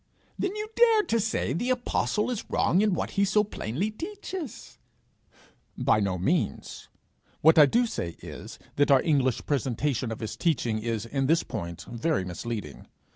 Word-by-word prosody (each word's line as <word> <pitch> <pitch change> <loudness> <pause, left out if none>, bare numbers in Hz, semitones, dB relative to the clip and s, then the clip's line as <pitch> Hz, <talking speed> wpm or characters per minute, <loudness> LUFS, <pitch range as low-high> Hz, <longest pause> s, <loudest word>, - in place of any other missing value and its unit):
'Then 390 +1 -1
you 425 0 -4
dare 455 -3 +5
to 230 - 0
say 215 - -1
the 240 - -1
apostle 245 -2 0
is 235 - -3
wrong 185 - +2
in 210 -3 +2
what - - -3
he 200 - +1
so 210 +1 +3
plainly 195 - -3
teaches?' 365 - -7 1.0
'By - - +3
no 100 -3 0
means; 120 - -2 0.5
what 160 +1 +6
I 150 - +9
do 240 - +3
say 85 - -4
is, - - -9 0.2
that 145 - +3
our 135 -2 +5
English 135 -6 +1
presentation 130 -2 -1
of 110 - -5
his 110 -1 -5
teaching 120 -9 0
is 115 -1 -2
in 135 +3 -1
this 165 +3 +3
point 85 -7 -6
very 120 - -1
misleading. 90 - -6
150 Hz, 165 wpm, -27 LUFS, -, 1.0 s, I